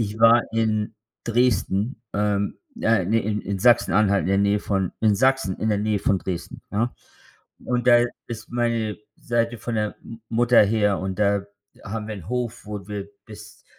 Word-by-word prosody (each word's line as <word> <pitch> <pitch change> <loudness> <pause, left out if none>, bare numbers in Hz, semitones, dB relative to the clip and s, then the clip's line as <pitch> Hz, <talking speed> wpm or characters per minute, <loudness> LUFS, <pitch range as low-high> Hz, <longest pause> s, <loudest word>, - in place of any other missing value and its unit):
ich 105 -1 -2
war 115 +1 +7
in 110 -1 0 0.3
Dresden 115 -1 +1
ähm, 100 -1 0 0.2
äh 115 -5 +2
ne, 110 +5 +2
in 105 +1 -2
in 100 0 -3
Sachsen-Anhalt, 105 -3 +4
in - - -3
der 95 0 +2
Nähe 100 +1 +2
von 95 -3 -1
in 110 -2 +4
Sachsen, 130 -5 +2
in 110 - -1
der 105 -2 +1
Nähe 105 0 0
von 95 0 +1
Dresden, 90 -2 -6
ja. 115 +4 -1 0.7
Und 125 0 -1
da 120 0 +7 0.2
ist 115 -1 -7
meine 115 -3 -1 0.2
Seite 115 -1 -1
von 120 +1 -4
der 105 -1 -1
M 115 0 -10
Mutter 120 0 +5
her 105 -1 +1
und 95 0 -4
da 100 -1 +2 0.4
haben 105 +1 -5
wir 110 - -4
‘n 95 -5 -10
Hof, 120 -2 -3
wo 105 -3 -6
wir 100 -1 -5 0.2
bis 105 -1 -13
105 Hz, 180 wpm, -23 LUFS, 100-115 Hz, 0.7 s, war